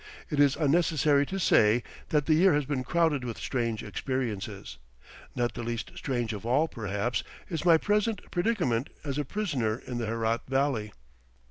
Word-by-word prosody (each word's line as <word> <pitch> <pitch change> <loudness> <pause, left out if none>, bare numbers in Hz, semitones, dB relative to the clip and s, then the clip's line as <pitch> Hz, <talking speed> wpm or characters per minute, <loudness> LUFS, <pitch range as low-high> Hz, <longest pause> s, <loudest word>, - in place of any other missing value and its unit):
It 150 - -1
is 140 -2 +5
unnecessary 150 -2 +3
to 195 - -3
say 115 - +4 0.3
that 150 -2 +2
the 155 - +3
year 170 +1 +5
has 145 -1 +1
been 130 -2 -2
crowded 160 -1 +1
with 120 -2 -4
strange 115 -4 -2
experiences. 105 - -4 0.6
Not 120 -2 0
the 120 - -5
least 115 -1 -4
strange 120 -5 -2
of 105 - -6
all, 130 +7 +2
perhaps, 110 -1 -2 0.3
is 165 -2 -3
my 170 -2 +7
present 210 +3 +1
predicament 175 - 0
as 140 -1 -2
a 145 - -1
prisoner 130 - -1
in 125 -2 -4
the 115 - -2
Herat 115 +1 0
Valley. 135 -5 0
130 Hz, 165 wpm, -28 LUFS, 115-155 Hz, 0.6 s, my